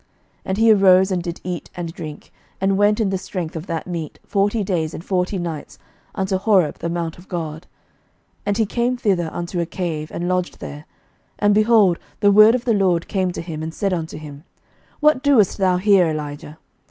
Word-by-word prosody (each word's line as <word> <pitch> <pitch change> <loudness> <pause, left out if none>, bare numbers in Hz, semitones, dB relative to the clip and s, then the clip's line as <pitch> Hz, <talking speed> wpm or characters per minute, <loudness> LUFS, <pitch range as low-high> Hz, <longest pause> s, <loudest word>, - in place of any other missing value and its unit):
11:019:008 - - -41 0.4
And 190 - -2
he 225 0 +6
arose, 190 -1 +5
and 180 -2 0
did 170 0 -6
eat 180 -1 -5
and 170 -2 -5
drink, 155 -4 -9 0.3
and 195 0 +1
went 205 +2 +3
in 205 -4 +1
the 190 - -1
strength 180 -4 -5
of 160 +2 -6
that 165 -2 -3
meat 170 -4 -5
forty 205 +2 +1
days 165 -5 -2
and 165 - -9
forty 185 +1 0
nights 165 -4 -5 0.4
unto 190 -1 0
Horeb 190 -7 +2
the 170 - -3
mount 170 -1 -3
of 180 - -16
God. 165 -2 -5 0.7
11:019:009 - - -38
And 205 0 +1
he 225 - +2
came 240 +4 -1
thither 190 -8 0
unto 175 +1 -4
a 170 - -1
cave, 160 -4 -4
and 175 - -3
lodged 180 0 -1
there; 150 +2 -8 0.5
and, 205 0 +3
behold, 215 -4 +4 0.2
the 205 -1 +4
word 215 +3 +7
of 250 0 -3
the 235 - +3
LORD 185 -5 +1
came 185 -2 0
to - - -5
him, 160 -2 -6
and 160 +1 -4
he - - -17
said 195 -2 0
unto 165 -3 -4
him, 150 -1 -10 0.6
What 300 -3 +4
doest 245 -10 +3
thou 185 -2 +3
here, 190 -2 +4
Elijah? 150 -1 -5
180 Hz, 210 wpm, -21 LUFS, 165-205 Hz, 0.7 s, word